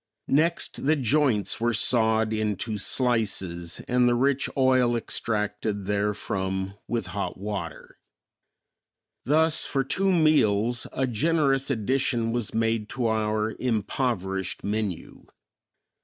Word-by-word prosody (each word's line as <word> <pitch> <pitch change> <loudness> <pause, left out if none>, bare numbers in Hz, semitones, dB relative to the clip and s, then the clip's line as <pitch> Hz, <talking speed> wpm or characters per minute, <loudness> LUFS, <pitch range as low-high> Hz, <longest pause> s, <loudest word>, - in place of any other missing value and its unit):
Next, 165 +4 +1
the 155 - +4
joints 130 - +1
were 120 0 +1
sawed 110 -1 +3
into 110 0 -2
slices 95 -8 -1
and 125 0 +3
the 120 - +2
rich 135 +2 +1
oil 130 -2 +3
extracted 105 -3 -2
therefrom 95 -2 -2
with 115 -1 -2
hot 100 - -3
water. 95 -4 -6 1.3
Thus 155 +4 +2
for 135 -1 0
two 190 +9 +1
meals 120 - +2
a 130 - -1
generous 135 +2 +1
addition 120 -1 0
was 120 -2 -2
made 115 -1 -1
to 125 -3 -3
our 110 0 -1
impoverished 105 -5 -2
menu. 105 -4 -4
115 Hz, 110 wpm, -26 LUFS, 105-130 Hz, 1.3 s, the